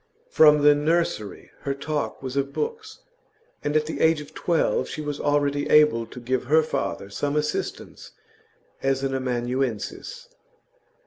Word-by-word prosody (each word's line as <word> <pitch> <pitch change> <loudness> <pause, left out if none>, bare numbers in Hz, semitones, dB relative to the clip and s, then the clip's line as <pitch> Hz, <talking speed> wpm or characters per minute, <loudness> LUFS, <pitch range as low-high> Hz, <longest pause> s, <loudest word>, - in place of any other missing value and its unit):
From 150 -1 +6
the 145 0 +8
nursery 150 - -1
her 140 -1 -3
talk 145 0 -3
was 130 0 -5
of 140 0 -1
books, 445 - -5 0.6
and 145 +1 -1
at 155 0 +3
the 160 - -5
age 160 -1 +4
of 150 - -11
twelve 170 -2 0
she - - -6
was 145 -1 -4
already 145 0 0
able 150 -7 +4
to 125 - -10
give 125 +1 -2
her 155 +4 +4
father 100 -9 -3
some 145 +7 -2
assistance 150 0 -3 0.7
as 135 0 0
an 135 0 -1
amanuensis. 130 - -3
145 Hz, 145 wpm, -24 LUFS, 130-155 Hz, 0.7 s, the